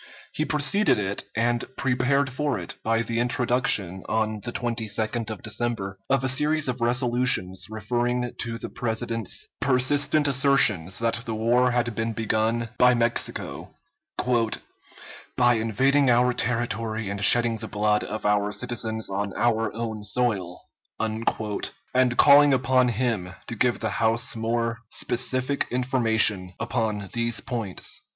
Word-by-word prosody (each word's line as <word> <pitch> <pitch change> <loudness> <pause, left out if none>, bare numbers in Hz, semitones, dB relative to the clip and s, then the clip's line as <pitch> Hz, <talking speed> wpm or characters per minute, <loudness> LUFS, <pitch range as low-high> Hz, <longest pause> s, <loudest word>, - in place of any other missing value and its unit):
He 155 - -1
preceded 155 +9 +2
it, 100 0 -2
and 120 +1 +1
prepared 135 +2 +1
for 145 0 -1
it, - - -5
by 115 0 +1
the 115 0 -2
introduction, 120 -6 +2
on 110 -1 -1
the 120 - -4
22d 115 -1 -2
of 110 -3 -7
December, 110 -3 -2
of 135 -1 +2
a - - +1
series 150 +3 +1
of 125 -1 -3
resolutions 120 -6 +1
referring 120 +3 -2
to 115 -1 -3
the - - -7
President's 115 -2 -2
persistent 145 +3 +2
assertions 125 - +2
that 115 -1 0
the 110 - -3
war 120 +3 +2
had 120 -1 -1
been 115 +1 -2
begun 110 +1 -1
by 125 0 +5
Mexico, 120 0 -2 1.6
"by 120 -1 +4
invading 130 +5 +2
our 125 +1 +3
territory 115 -3 -2
and 100 +1 -3
shedding 115 +1 +5
the - - -6
blood 105 -1 0
of 110 0 -6
our 105 0 +1
citizens 110 -1 -2
on 100 0 -3
our 115 -1 +1
own 110 -2 -5
soil," 105 -5 -1 0.4
and 115 +3 -2
calling 145 0 +7
upon 130 0 +2
him 110 -6 -2
to - - -5
give 120 +2 +1
the 110 - -2
House 115 +1 +1
more 115 +1 -2
specific 130 +3 -1
information 110 -7 +1
upon 110 -4 -2
these 115 0 0
points. 115 -7 -4
115 Hz, 135 wpm, -25 LUFS, 110-125 Hz, 1.6 s, calling